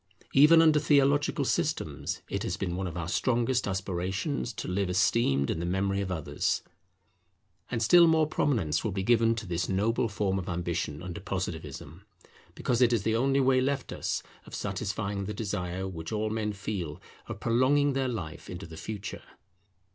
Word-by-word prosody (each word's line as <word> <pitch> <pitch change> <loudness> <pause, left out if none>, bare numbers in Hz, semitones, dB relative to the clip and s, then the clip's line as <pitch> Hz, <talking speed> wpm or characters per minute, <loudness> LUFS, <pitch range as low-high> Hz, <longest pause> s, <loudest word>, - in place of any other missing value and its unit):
Even 160 +4 +7
under 155 -2 +5
theological 145 0 +3
systems - - -2
it - - -3
has - - -2
been 90 -2 -2
one 95 0 -2
of 90 - -6
our 85 -1 -3
strongest 120 +4 +1
aspirations 95 - -2
to - - -6
live 95 +1 -1
esteemed 90 -7 +2
in - - -2
the - - -3
memory 95 +2 0
of 95 -2 -3
others. 80 -5 -1 1.1
And 120 -2 -1
still 170 +8 +7
more 160 -1 +4
prominence 110 - 0
will 110 - -1
be 95 0 -2
given 115 +1 +3
to 110 -1 -5
this 85 -1 -2
noble 110 +5 +1
form 100 -1 -1
of 90 - -6
ambition 85 -3 -3
under 90 -2 -6
Positivism, 80 +8 -5 0.5
because 125 0 0
it 125 -1 +5
is 115 -4 +1
the 110 +1 +1
only 135 +3 +2
way 130 -1 +4
left 135 0 -1
us - - -2 0.2
of - - -8
satisfying 100 0 -3
the 105 +1 -5
desire 95 -3 -3
which 80 -4 -6
all 110 0 -1
men 110 -1 -1
feel 95 -6 -4 0.3
of - - -6
prolonging 135 +5 +3
their 135 -1 0
life 85 -11 -5
into 90 +2 -6
the 80 -1 -10
Future. 100 +1 -6
100 Hz, 175 wpm, -29 LUFS, 90-125 Hz, 1.1 s, Even